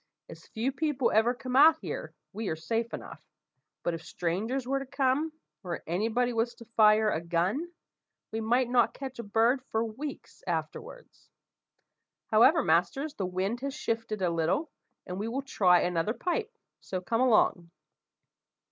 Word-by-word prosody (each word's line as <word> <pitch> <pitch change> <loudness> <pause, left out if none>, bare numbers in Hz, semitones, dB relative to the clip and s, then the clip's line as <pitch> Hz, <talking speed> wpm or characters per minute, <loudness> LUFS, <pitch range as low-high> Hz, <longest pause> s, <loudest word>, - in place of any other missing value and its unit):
As - - -13
few 235 +4 -2
people 285 -2 0
ever 230 +3 +3
come 255 0 -5
out 310 +4 +7
here - - -5 0.2
we 215 +1 -4
are 160 - -1
safe 225 +9 -2
enough; - - -8 0.6
but 175 - 0
if 165 - -5
strangers 215 +13 -2
were 275 +1 +1
to 275 - -6
come, 275 +3 +1 0.3
or 175 -2 -5
any 180 +7 0
body 245 +2 0
was 230 +1 -1
to 235 - -13
fire 215 -1 +4
a 160 - -1
gun, 180 - -1 0.6
we 220 +1 -3
might 240 +3 +2
not 240 -1 +2
catch 265 -2 -7
a - - -3
bird 230 +5 +2
for 225 -2 -1
weeks 265 +7 -8
afterwards. - - -6 1.0
However, 260 +8 +6
masters, 190 - +1
the 190 - -3
wind 190 +6 -2
has 275 +1 -4
shifted 225 -6 -3
a 175 - +2
little, 170 - 0 0.3
and 180 +1 -5
we 210 - -2
will 265 +4 -3
try 180 -9 +4
another 180 +5 0
pipe; 425 +5 -2 0.3
so 185 - -4
come 225 +6 -1
along." 215 -8 +3
230 Hz, 165 wpm, -29 LUFS, 190-265 Hz, 1.0 s, out